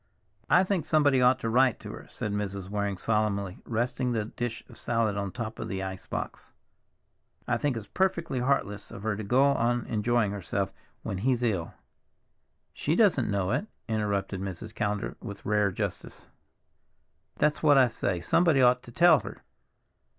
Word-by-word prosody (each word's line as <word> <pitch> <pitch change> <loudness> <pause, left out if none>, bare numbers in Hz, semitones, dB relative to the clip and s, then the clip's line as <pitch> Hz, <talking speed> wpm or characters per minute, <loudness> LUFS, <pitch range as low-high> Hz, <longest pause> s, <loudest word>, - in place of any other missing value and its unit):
"I 180 - +6
think 185 -3 0
somebody 145 -4 +3
ought 125 +1 +5
to 115 - -1
write 125 0 +3
to - - -7
her," - - -10
said 105 - -4
Mrs. 100 -2 -3
Waring 100 -2 -1
solemnly, 100 -2 -1
resting 125 +2 -1
the 110 -2 -1
dish 120 +1 -5
of - - -14
salad 115 -3 0
on 100 0 -2
the - - -7
top 115 -3 -6
of 110 - -4
the 95 -2 -3
ice 95 -1 -6
box. - - -5 1.0
"I 120 -1 +1
think 135 -1 -1
it's 110 - -6
perfectly 170 -6 0
heartless 120 -6 -1
of 100 - -9
her 110 -1 0
to 110 - -5
go 125 +7 +3
on 120 -3 +2
enjoying 115 -1 +1
herself 100 0 -3 0.3
when 95 - -3
he's 125 +2 +1
ill." 95 -8 -1 1.0
"She 155 - 0
doesn't 180 - +3
know 100 -1 0
it," 140 - -1 0.2
interrupted 100 -3 -1
Mrs. 100 +3 -6
Callender 105 -2 -2
with 100 -3 -8
rare 105 -1 +2
justice. - - -5 1.1
"That's 150 0 +1
what 145 -3 +5
I 130 - +7
say, 100 -6 -2
somebody 165 - +3
ought 125 0 +5
to 120 - -13
tell 170 +3 +6
her. - - -10
115 Hz, 170 wpm, -28 LUFS, 100-130 Hz, 1.1 s, I